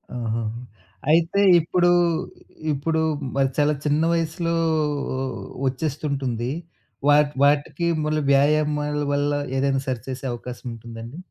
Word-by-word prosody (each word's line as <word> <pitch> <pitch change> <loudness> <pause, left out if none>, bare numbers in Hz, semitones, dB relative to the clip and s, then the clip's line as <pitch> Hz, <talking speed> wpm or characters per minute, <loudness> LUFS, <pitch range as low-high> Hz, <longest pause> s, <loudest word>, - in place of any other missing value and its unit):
ఆహా! 115 -1 -2 0.7
అయితే 165 +4 +3 0.2
ఇప్పుడు, 175 +2 +2 0.8
ఇప్పుడు 160 +3 0 0.3
మరి 135 -1 +2
చాలా 150 0 +3
చిన్న 150 +1 +2
వయస్సులో 165 0 -1 1.1
ఒచ్చేస్తుంటుంది. 135 -3 -2 0.6
వాటి 145 0 +5
వాటికి 145 +4 +2 0.2
మళ్ళీ 155 0 0
వ్యాయామాల 150 +1 +2
వల్ల 145 0 +1 0.3
ఏదైనా 135 0 +1
సరిచేసే 130 +1 -4
అవకాశముంటుందాండి? 120 0 -8
145 Hz, 90 wpm, -23 LUFS, 130-155 Hz, 1.1 s, వాటి